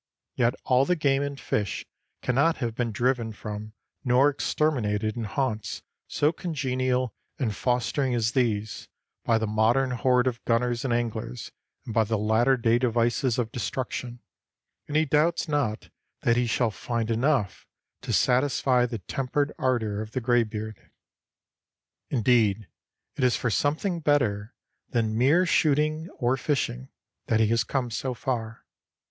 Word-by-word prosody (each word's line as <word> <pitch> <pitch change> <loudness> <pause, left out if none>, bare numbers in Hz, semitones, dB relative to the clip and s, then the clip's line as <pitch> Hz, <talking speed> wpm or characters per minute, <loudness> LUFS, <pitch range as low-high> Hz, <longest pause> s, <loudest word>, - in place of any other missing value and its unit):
Yet 120 +1 +1
all 130 +1 +3
the 180 - +2
game 140 -4 +2
and 140 -1 -4
fish 105 -3 -2 0.4
cannot 140 +6 +2
have 120 -4 -2
been 120 0 -2
driven 120 0 0
from 105 0 -7 0.3
nor 130 +2 +4
exterminated 110 -8 0
in 115 -2 -3
haunts 110 0 -2 0.2
so 150 +1 +2
congenial 130 - -1 0.2
and 110 -7 -1
fostering 125 +2 0
as 115 -1 +1
these, 110 -5 -1 0.4
by 115 - +3
the 110 - -1
modern 115 +5 +2
horde 125 0 +2
of 120 -2 -2
gunners 120 0 0
and 135 - -1
anglers 115 - -3 0.3
and 115 - -6
by 110 - +4
the 110 +1 -1
latter 110 +5 +3
day 115 0 +2
devices 120 0 +1
of 115 -3 -1
destruction, 125 0 -4 0.7
and 150 - 0
he 155 - +3
doubts 155 +5 +2
not 140 -8 -1 0.3
that 115 - +3
he 120 0 +1
shall 115 0 +1
find 115 +1 -3
enough 115 -4 0 0.3
to - - -4
satisfy 125 -1 +2
the 115 -1 -4
tempered 135 - -2
ardor 110 -5 0
of 110 0 -8
the - - 0
graybeard. 110 -3 0 1.3
Indeed, 110 -4 +2 0.5
it 135 - -1
is 125 -1 +4
for 125 - -1
something 160 - 0
better 120 -8 0 0.3
than 110 -3 0
mere 145 +10 +4
shooting 155 +1 +1
or 125 -1 +1
fishing 65 - -2 0.4
that 110 - +2
he 110 -1 +3
has 115 0 +2
come 125 0 -2
so 125 +4 -3
far. 115 -4 -4
120 Hz, 145 wpm, -26 LUFS, 110-135 Hz, 1.3 s, nor